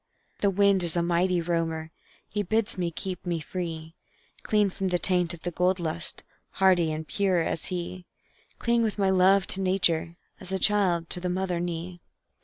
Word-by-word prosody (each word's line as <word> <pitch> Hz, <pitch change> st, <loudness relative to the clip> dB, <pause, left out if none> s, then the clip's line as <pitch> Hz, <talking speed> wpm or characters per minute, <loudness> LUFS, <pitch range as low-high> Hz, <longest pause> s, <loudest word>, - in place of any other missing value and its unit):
The 200 Hz, -, +2 dB
wind 200 Hz, 0 st, +3 dB
is 170 Hz, 0 st, 0 dB
a 170 Hz, -, +2 dB
mighty 175 Hz, +1 st, +1 dB
roamer; 165 Hz, -2 st, -2 dB, 0.4 s
He 210 Hz, -, -2 dB
bids 220 Hz, +2 st, -1 dB
me 180 Hz, -3 st, -1 dB
keep 180 Hz, +2 st, -6 dB
me 175 Hz, -2 st, -2 dB
free, 160 Hz, -1 st, -6 dB, 0.5 s
Clean 210 Hz, -2 st, +2 dB
from 190 Hz, +1 st, -3 dB
the 180 Hz, -1 st, +1 dB
taint 180 Hz, -1 st, +3 dB
of 165 Hz, -, -18 dB
the 175 Hz, -, -2 dB
gold 180 Hz, +2 st, +1 dB
lust, 170 Hz, 0 st, -2 dB, 0.3 s
Hardy 180 Hz, -4 st, +3 dB
and 155 Hz, 0 st, -5 dB
pure 190 Hz, -4 st, +1 dB
as 160 Hz, -, -3 dB
he; 180 Hz, 0 st, -5 dB, 0.5 s
Cling 235 Hz, 0 st, +1 dB
with 220 Hz, -2 st, -1 dB
my 195 Hz, -2 st, +2 dB
love 190 Hz, +1 st, +4 dB
to 195 Hz, -, +1 dB
nature, 170 Hz, -3 st, +2 dB, 0.2 s
As 190 Hz, 0 st, -8 dB
a 190 Hz, -, 0 dB
child 185 Hz, -5 st, +2 dB
to -, -, +2 dB
the 180 Hz, 0 st, -3 dB
mother 180 Hz, -1 st, -1 dB
knee. 175 Hz, 0 st, -5 dB
180 Hz, 185 wpm, -27 LUFS, 170-190 Hz, 0.5 s, love